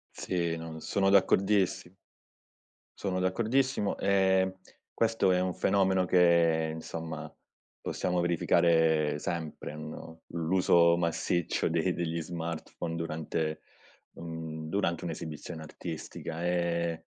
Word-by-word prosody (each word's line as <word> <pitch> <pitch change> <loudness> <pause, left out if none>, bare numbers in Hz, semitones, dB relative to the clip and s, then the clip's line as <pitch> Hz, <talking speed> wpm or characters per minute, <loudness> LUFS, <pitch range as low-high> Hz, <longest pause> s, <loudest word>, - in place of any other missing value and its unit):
Sì, 85 -2 -1
non 80 -1 -7
sono 95 +4 +1
d'accordissi 100 -2 +3 1.0
sono 95 -2 -2
d'accordissimo. 110 +3 +1
Ehm, 95 -1 +2 0.4
questo 115 -4 +2
è 90 - +3
un 90 -1 -1
fenomeno 95 -1 +2
che 85 -3 +4
insomma 80 -1 -6 0.5
possiamo 90 -1 -1
verificare 80 -3 +3
sempre, 80 -2 -4
no, 80 +1 -9
l'uso 85 0 +3
massiccio 85 0 0
de 85 +2 +1
degli 85 -1 -2
smartphone 85 0 -5
durante 80 -1 -3 0.5
un 80 -1 -6
durante 85 -2 -1
un'esibizione 80 0 -6
artistica. 80 +1 -6
Ehm, 85 -1 0
85 Hz, 100 wpm, -30 LUFS, 80-95 Hz, 1.0 s, che